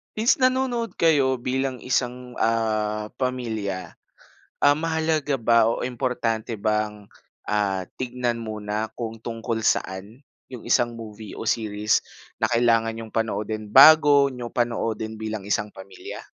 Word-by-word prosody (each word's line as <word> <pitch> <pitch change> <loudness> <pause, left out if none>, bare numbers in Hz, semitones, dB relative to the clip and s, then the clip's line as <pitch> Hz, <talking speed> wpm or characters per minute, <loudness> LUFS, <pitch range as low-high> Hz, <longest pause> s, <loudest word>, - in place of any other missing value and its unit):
Is 225 +4 +3
nanonood 255 -3 +1
kayo 135 -6 +2
bilang 130 0 -2
isang, 125 -1 -2
ah, 110 -2 0
pamilya. 110 -7 -3 0.6
Ah, 145 +1 +5
mahalaga 160 -4 0
ba 115 0 +4
o 115 - 0
importante 120 -3 -2
bang, 105 -1 -2 0.4
ah, 100 -3 0 0.2
tignan 125 -2 -2
muna 110 -1 -4
kung 115 -1 -5
tungkol 115 0 -4
saan 100 +7 -1 0.2
yung 125 -3 -10
isang 120 -1 +1
movie 110 -2 -9
o 110 - -3
series 105 -1 0 0.3
na - - +1
kailangan 115 -1 +2
niyong 115 0 -8
panoodin 110 -1 -3
bago 145 -1 +8
niyo 125 -2 -7
panoodin 115 -2 -2
bilang 110 -1 -4
isang 105 0 -1
pamilya? 95 0 -9
115 Hz, 125 wpm, -24 LUFS, 110-130 Hz, 0.6 s, bago